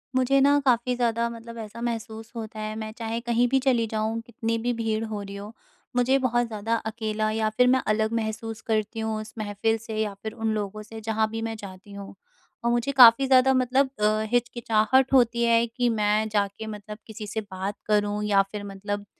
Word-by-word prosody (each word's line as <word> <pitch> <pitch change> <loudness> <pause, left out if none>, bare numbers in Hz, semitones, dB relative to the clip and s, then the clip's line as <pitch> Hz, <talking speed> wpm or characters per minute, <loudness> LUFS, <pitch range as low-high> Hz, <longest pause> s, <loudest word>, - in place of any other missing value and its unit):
मुझे 260 +2 +3
ना, 285 +1 +5
काफ़ी 250 -1 +2
ज़्यादा 235 -1 0
मतलब 230 0 -9
ऐसा 220 +1 -8
महसूस 225 -1 -4
होता 220 -1 -6
है, 215 0 -4
मैं 220 0 -5
चाहे 230 -1 -3
कहीं 240 +1 +2
भी 265 +2 +2
चली 240 -4 +3
जाऊँ, 220 +1 -2
कितनी 230 0 -3
भी 240 +2 -1
भीड़ 225 -1 -1
हो 215 -2 -5
रही 200 0 -8
हो, 205 +2 -8 0.4
मुझे 250 +2 +3
बहुत 240 -2 +1
ज़्यादा 225 +1 -2
अकेला 215 -1 -2
या 220 0 0
फिर 250 0 +5
मैं 260 +1 +4
अलग 215 +1 +1
महसूस 220 +1 -5
करती 220 0 -1
हूँ, 220 -1 -2
उस 215 +1 -11
महफ़िल 215 +1 -1
से 220 -1 -7
या 215 -2 -1
फिर 220 0 -4
उन 220 -1 -1
लोगों 210 0 -4
से, 220 +1 -10
जहाँ 220 0 0
भी 225 +1 -4
मैं 225 0 -3
जाती 200 -1 -11
हूँ। 200 0 -9 0.5
और 235 - +2
मुझे 240 +3 0
काफ़ी 255 -1 +8
ज़्यादा 260 0 +5
मतलब 260 +1 +2
अ, 215 +1 +2
हिचकिचाहट 245 +1 +2
होती 235 -2 +4
है 230 0 +4
कि 240 +1 0
मैं 215 -1 +1
जाके 205 +1 -1
मतलब 210 0 -7
किसी 215 -1 -7
से 220 +2 -3
बात 190 +2 -4
करूँ 210 0 +1
या 205 -2 +4
फिर 210 -1 -5
मतलब 205 +1 -5
225 Hz, 205 wpm, -25 LUFS, 215-235 Hz, 0.5 s, काफ़ी